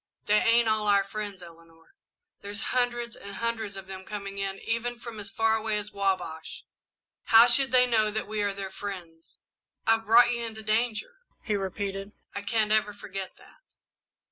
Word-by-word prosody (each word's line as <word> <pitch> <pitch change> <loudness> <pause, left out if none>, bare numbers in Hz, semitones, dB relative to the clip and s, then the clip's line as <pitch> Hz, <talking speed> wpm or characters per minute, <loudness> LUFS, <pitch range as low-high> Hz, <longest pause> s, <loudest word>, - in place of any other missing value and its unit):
"They 210 0 +4
ain't 230 0 +4
all 215 -1 +1
our 200 -1 +5
friends, 200 -2 -6
Eleanor. 165 - -17 0.5
There's 205 0 -5
hundreds 240 -2 0
and 200 0 -9
hundreds 225 -3 -2
of 195 - -8
them 190 0 -8
coming 200 -1 -6
in, 195 0 -2
even 235 +3 -2
from 235 -2 -8
as 200 -1 -7
far 225 +3 +2
away 220 -1 -1
as 210 0 -4
the - - -18
Wabash. 175 -5 -2 0.6
How 225 +1 +8
should 245 +1 +4
they 250 -1 +7
know 220 -3 +2
that 215 0 -3
we 215 0 -2
are 205 -1 +1
their 195 -1 -6
friends? 175 -5 -8 0.5
I've 225 -1 +2
brought 240 +2 +7
you 235 -1 -1
into 220 -1 -6
danger," 225 - -1 0.3
he 210 - 0
repeated. 195 +1 -4 0.2
"I 200 - -4
can't 215 +1 0
ever 215 -1 +2
forget 195 -2 -7
that." - - -19
210 Hz, 180 wpm, -28 LUFS, 195-225 Hz, 0.6 s, How